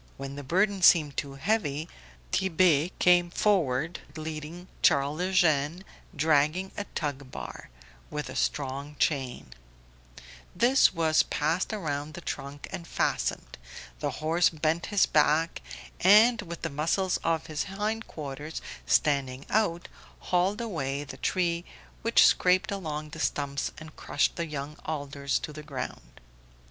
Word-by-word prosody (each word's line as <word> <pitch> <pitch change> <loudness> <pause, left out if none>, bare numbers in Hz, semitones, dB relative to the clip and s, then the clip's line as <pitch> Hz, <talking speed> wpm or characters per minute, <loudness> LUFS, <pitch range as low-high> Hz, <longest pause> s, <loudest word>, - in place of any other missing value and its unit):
When 135 0 -6
the 145 - -6
burden 190 +7 +1
seemed 155 -5 +6
too 140 -1 -4
heavy, 160 -2 -1 0.4
Tit'Bé 175 -4 +3
came 175 -1 +4
forward 170 -6 +1 0.2
leading 155 +3 -6
Charles 140 +4 +3
Eugene 175 -2 +2 0.3
dragging 155 +5 +2
a 205 - -4
tug 140 -3 -3
bar - - -8 0.4
with 150 0 -4
a - - -8
strong 140 +1 -2
chain; 130 - -1 1.0
this 245 +8 +5
was 160 -3 +3
passed 160 +8 -1
round 150 -7 -3
the - - -7
trunk 140 +1 -6
and 180 -3 -6
fastened, - - -2 0.4
the - - -1 0.2
horse 170 +3 +4
bent 160 +1 -1
his 205 -3 +3
back, 155 +2 +2 0.4
and 215 +5 +6
with 170 -4 -8
the - - -2
muscles 170 +6 0
of 165 -1 0
his 155 -1 -3
hindquarters 190 -8 -4 0.3
standing 140 -2 +1
out, 175 -6 +1 0.3
hauled 185 +4 0
away 145 -10 -3
the 135 -2 -9
tree 170 0 0 0.4
which - - +5
scraped 185 +4 +3
along 155 -6 -4
the 160 +1 -9
stumps 140 -2 -1
and 155 -1 -11
crushed 145 - 0
the 170 -1 -3
young 150 0 -5
alders 140 -2 -2
to 150 - -6
the 155 - -8
ground. 140 -4 -7
155 Hz, 135 wpm, -28 LUFS, 145-180 Hz, 1.0 s, seemed